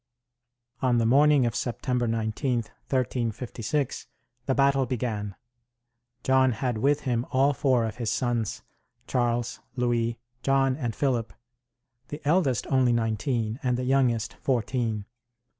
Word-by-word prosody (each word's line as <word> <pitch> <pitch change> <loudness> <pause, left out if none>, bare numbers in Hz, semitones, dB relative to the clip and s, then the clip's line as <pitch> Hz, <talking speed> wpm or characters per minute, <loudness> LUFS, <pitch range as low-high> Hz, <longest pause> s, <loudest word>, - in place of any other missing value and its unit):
On 125 -2 +3
the 115 - +2
morning 140 +2 +5
of 120 0 -1
September 125 0 -1
19,1356, 120 +2 -2 0.4
the 135 - +2
battle 135 -1 +3
began. 110 -5 -3 0.9
John 130 -1 +4
had 120 0 -2
with 145 +5 +2
him 120 -4 0
all 135 +2 +3
four 130 -3 +2
of 110 +1 -5
his 120 -3 -2
sons, 120 -2 -1 0.4
Charles, 120 -1 0 0.2
Louis, 120 -2 0 0.2
John 135 0 +2
and 120 -6 -3
Philip; 125 -5 0 0.8
the 145 - -6
eldest 150 - +2
only 130 -2 +4
nineteen, 115 +1 -1
and 125 -3 0
the 125 - -2
youngest 125 -4 +1
fourteen. 115 -4 -1
125 Hz, 120 wpm, -27 LUFS, 115-135 Hz, 0.9 s, morning